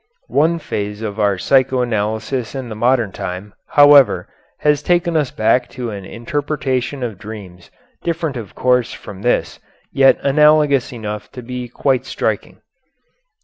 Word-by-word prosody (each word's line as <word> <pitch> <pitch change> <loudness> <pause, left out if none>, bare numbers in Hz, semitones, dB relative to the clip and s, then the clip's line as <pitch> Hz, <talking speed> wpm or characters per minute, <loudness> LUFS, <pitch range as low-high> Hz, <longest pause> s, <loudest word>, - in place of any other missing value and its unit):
One 165 +3 +3
phase 105 -8 -4
of 105 -1 -4
our 100 -2 +2
psycho 130 +3 +2
analysis 110 +2 -2
in 130 -3 -5
the 110 - -6
modern 120 -1 +1
time, 95 +3 -6
however, 145 -2 +6 0.3
has 150 -1 +2
taken 175 +1 +1
us 150 -5 +1
back 125 +3 +1
to 120 -3 -3
an 100 -2 -7
interpretation 135 +1 -3
of 110 -6 -5
dreams 100 -5 -10 0.3
different 165 -4 -2
of 115 -5 -8
course 125 -1 +2
from 95 -1 -10
this, 120 - 0 0.3
yet 135 -1 +5
analogous 150 -1 +4
enough 105 -3 -6
to 125 - -8
be 125 +1 -5
quite 130 +1 0
striking. - - -3
125 Hz, 145 wpm, -18 LUFS, 110-140 Hz, 0.3 s, however